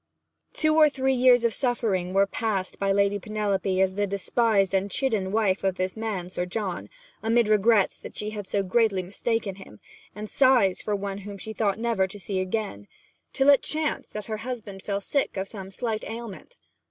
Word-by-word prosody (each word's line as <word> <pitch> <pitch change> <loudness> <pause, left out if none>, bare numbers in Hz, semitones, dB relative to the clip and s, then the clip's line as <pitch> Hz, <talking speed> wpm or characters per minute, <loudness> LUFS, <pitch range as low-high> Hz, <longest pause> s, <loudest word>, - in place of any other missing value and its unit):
Two 310 0 +1
or 305 -1 +7
three 265 -1 0
years 250 -1 +5
of 230 -1 +2
suffering 220 -9 0
were 195 +1 +4
passed 200 -2 -3
by 195 0 +1
Lady 200 +1 +2
Penelope 200 -2 -1
as 190 -1 +3
the 205 +1 0
despised 200 0 +1
and 195 +1 +1
chidden 215 -7 0
wife 205 -3 +1
of 190 -1 +1
this 185 0 -2
man 215 -5 -3
Sir 180 0 -3
John, 185 -1 -4 0.3
amid 230 0 +2
regrets 215 -1 +3
that - - -10
she 210 0 -3
had 205 -2 -6
so 200 +1 0
greatly 195 -1 +2
mistaken 205 +1 -2
him, 105 - -13 0.4
and 210 +1 -6
sighs 245 -7 +3
for 210 - -1
one 200 0 -4
whom 200 0 -8
she 220 +3 -7
thought 210 -3 0
never 225 -4 +1
to 205 +2 -9
see 195 0 -3
again, 185 - -3 0.4
till 270 +1 +3
it 280 - +5
chanced 310 0 -2
that 210 -1 -5
her 215 -1 -4
husband 215 -4 -6
fell 200 0 -2
sick 275 +1 -1
of 190 +1 -2
some 195 -3 -7
slight 220 +2 -3
ailment. 230 - -8
205 Hz, 190 wpm, -26 LUFS, 195-230 Hz, 0.4 s, or